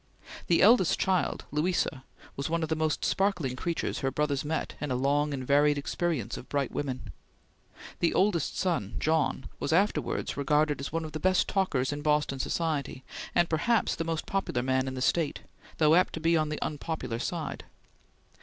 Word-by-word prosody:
The 170 - +4
eldest 205 -4 +5
child, 190 -2 0
Louisa, 150 -3 0 0.3
was 140 +3 -3
one 165 0 0
of 160 - -2
the 160 - +1
most 155 -1 0
sparkling 180 -10 0
creatures 170 +5 -2
her 135 - 0
brother 145 +2 0
met 155 +1 -2
in 150 - -2
a 130 - 0
long 145 +3 +1
and 130 -2 -4
varied 145 +2 +4
experience 145 - -2
of - - -10
bright 140 -2 -1
women. 130 - -4 0.9
The 170 - +1
oldest 190 -6 +1
son, 165 - -1
John, 155 -4 0
was - - -2
afterwards 195 +6 +1
regarded 150 +1 +2
as 140 - -5
one 165 0 -2
of 155 - -7
the 155 - -4
best 185 +1 +2
talkers 145 -9 0
in 145 - -5
Boston 150 -2 +1
society, 145 -3 -2 0.3
and 175 -1 +4
perhaps 210 +8 +1
the 165 - -2
most 165 -1 -2
popular 195 -11 -1
man 130 0 +1
in 130 - -4
the 130 - -2
State, 165 -1 +1 0.4
though 155 -1 +5
apt 180 +2 +4
to - - -4
be 165 +1 +3
on 155 -1 +1
the 150 - -3
unpopular 150 -6 -4
side. 165 +4 -4
150 Hz, 180 wpm, -29 LUFS, 140-170 Hz, 0.9 s, eldest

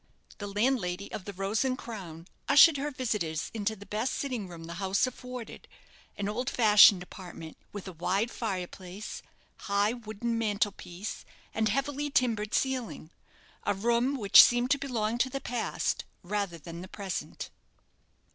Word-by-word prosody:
The 205 - -4
landlady 200 -3 0
of 190 - -6
the 205 - -6
"Rose 195 +4 0
and 255 -1 0
Crown" 180 -10 -8 0.2
ushered 295 +1 +8
her 285 +2 -2
visitors 210 - -2
into 220 0 -1
the 200 0 -12
best 220 +6 -2
sitting 250 -8 -3
room 170 -2 -10
the 170 +1 -7
house 195 +4 +2
afforded 250 -1 -8 0.5
an 200 - -2
old 240 +5 -2
fashioned 210 -5 +7
apartment, 175 -4 -10 0.2
with 205 -2 -7
a - - -5
wide 195 +7 0
fire 195 -6 -2
place, 185 +3 -8 0.5
high 200 +2 +3
wooden 230 0 -3
mantel 205 -2 +1
piece, 185 +2 -7 0.3
and 220 -1 +1
heavily 280 +4 -1
timbered 230 -7 +1
ceiling 255 -11 -2 0.5
a 205 - +1
room 235 +6 +1
which 205 -7 +9
seemed 245 +2 +3
to 285 - +3
belong 235 -4 -1
to 260 - +2
the 275 - -3
past 245 -3 -2 0.2
rather 200 -2 -2
than 165 +2 -9
the 185 - -8
present. 195 -1 -5
210 Hz, 155 wpm, -29 LUFS, 195-245 Hz, 0.5 s, which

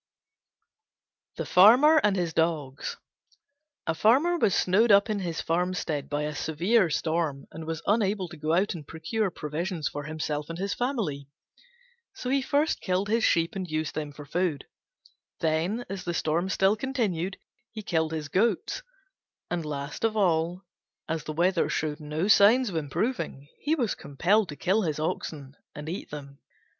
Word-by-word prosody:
THE - - -4
FARMER 255 +12 +7
AND 205 -2 +3
HIS 175 -3 -1
DOGS 155 -5 -1 0.9
A 160 - 0
Farmer 260 - +4
was 200 - +3
snowed 210 +5 +3
up 200 +2 +5
in 210 - -1
his 170 -4 -3
farmstead 170 -3 -1
by 145 0 -1
a 150 0 -3
severe 175 +7 +2
storm, 155 -2 -1
and 160 0 -8
was 160 -1 -4
unable 205 -3 +1
to 170 - -10
go 155 +1 -1
out 190 +4 +2
and 155 -5 -9
procure 190 +6 -2
provisions 160 +1 -3
for 145 0 -5
himself 150 -1 -3
and 165 - -5
his 195 +2 -2
family. 215 - -2 0.9
So 255 -10 -4
he 275 0 +3
first 290 +4 +1
killed 190 +2 0
his 225 +1 +2
sheep 165 -2 +2
and 185 -2 -4
used 155 -1 -2
them 150 -1 -4
for 145 0 -11
food; 170 -1 -1 0.7
then, 170 +9 0
as 195 -1 -5
the 175 -1 -3
storm 165 +5 0
still 195 +2 +3
continued, 210 -8 -2 0.3
he 215 -1 -7
killed 160 -4 0
his 155 -2 -3
goats; 215 - 0 0.7
and, 175 -1 -1
last 145 +2 -5
of 220 -1 +1
all, 175 -1 +1 0.4
as 160 -1 -3
the - - -4
weather 175 +4 +2
showed 150 0 -2
no 155 +4 -2
signs 215 +3 +6
of - - -6
improving, 150 - -2
he 305 +3 +1
was 245 -9 0
compelled 185 +8 +1
to 145 - -6
kill 190 +8 +1
his 155 -6 -2
oxen 145 -3 -4 0.2
and 150 +1 -7
eat 180 - -5
them. 140 -2 -9
170 Hz, 165 wpm, -27 LUFS, 155-205 Hz, 0.9 s, FARMER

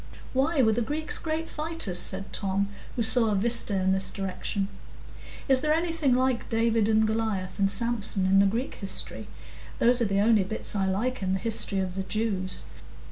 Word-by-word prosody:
"Why, 275 +2 +2
were 220 - +4
the 230 +2 0
Greeks 300 +7 -1
great 320 0 -3
fighters?" 305 - -2
said 195 +2 -4
Tom, 200 0 -1 0.3
who 235 - 0
saw 225 0 +5
a 210 - +1
vista 230 0 +2
in 190 0 +1
this 190 -1 +1
direction. 195 +1 -3 0.8
"Is 265 -2 +4
there 305 +1 +2
anything 325 -6 +1
like 255 -1 0
David 225 -1 +1
and 220 0 +3
Goliath 215 -4 -2
and 195 0 +3
Samson 210 -2 +2
in 195 +1 +4
the 200 - +5
Greek 235 +7 -2
history? 195 -2 -3 0.5
Those 245 +1 +4
are - - +3
the 195 -1 0
only 215 -1 +4
bits 210 +2 -3
I 195 -1 0
like 225 +7 -1
in 190 -1 -1
the 190 - -1
history 225 -1 -1
of 185 -1 -4
the 195 - -3
Jews." 190 -2 -2
220 Hz, 190 wpm, -27 LUFS, 195-245 Hz, 0.8 s, saw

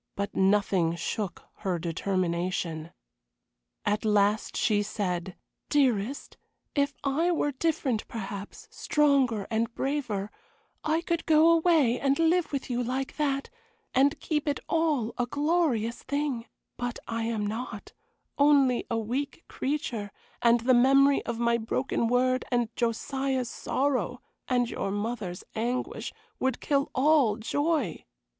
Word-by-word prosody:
But 200 +1 -3
nothing 190 -4 +2
shook 195 +2 -4
her 185 -3 -1
determination. 170 -1 -2 1.0
At 210 +1 +1
last 210 0 +2
she 205 -1 +2
said: 190 -3 -3 0.3
"Dearest, 260 -3 +1 0.4
if 280 -1 +1
I 310 +6 +1
were 300 -3 +1
different 275 -5 -1
perhaps, 205 - -7
stronger 275 - +2
and 225 +1 0
braver, 245 -8 -2 0.5
I 315 +2 +1
could 335 -1 -2
go 320 +1 +6
away 320 -7 +4
and 275 0 +2
live 330 +1 +2
with 280 -2 -3
you 245 -1 -1
like 260 +2 -3
that, 275 -2 -1 0.4
and 280 +4 +3
keep 300 -1 -2
it 290 - 0
all 305 -9 +1
a 245 - +1
glorious 285 -6 0
thing; 280 -5 -2 0.3
but 245 0 -3
I 230 -1 -2
am 225 -2 -1
not 220 0 -5 0.5
only 280 -4 +4
a 230 - 0
weak 255 +8 -3
creature, 245 -7 -3 0.3
and 235 0 +4
the 255 +2 +4
memory 275 +3 +5
of 235 -1 -2
my 235 0 +2
broken 235 +1 -1
word, 255 +1 +2
and 240 -2 0
Josiah's 260 +2 -1
sorrow, 275 -1 -1 0.3
and 245 -2 +2
your 195 - -3
mother's 205 -3 -3
anguish, 240 +3 -2 0.3
would 260 0 0
kill 280 -1 +1
all 270 -6 +4
joy. 285 - -1
245 Hz, 130 wpm, -28 LUFS, 215-285 Hz, 1.0 s, go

